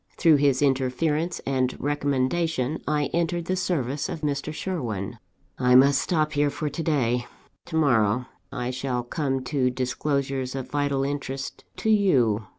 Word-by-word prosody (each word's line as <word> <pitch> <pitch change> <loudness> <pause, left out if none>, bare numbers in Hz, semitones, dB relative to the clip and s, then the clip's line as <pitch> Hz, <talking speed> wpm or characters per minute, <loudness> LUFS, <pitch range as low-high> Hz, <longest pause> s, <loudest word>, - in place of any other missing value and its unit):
Through 160 -3 +5
his 140 -1 +2
interference 145 +5 0
and 130 -2 0
recommendation, 145 +1 0
I 150 -2 0
entered 170 0 0
the 185 - 0
service 150 -7 -1
of 160 - -5
Mr. 145 0 -2
Sherwin. 120 - -4 0.4
"I 125 -1 +4
must 135 +1 +6
stop 155 -3 0
here 145 0 +2
for 150 +1 -3
to 145 - -5
day. 125 -7 0 0.4
To 165 - -5
morrow 125 -6 +3 0.3
I 125 -2 -3
shall 125 -1 -2
come 135 0 -2
to 130 -1 +1
disclosures 130 +1 -2
of 135 -2 -5
vital 145 -2 0
interest 140 -1 -4
to 220 - 0
you. 125 - +3
140 Hz, 150 wpm, -25 LUFS, 130-155 Hz, 0.4 s, must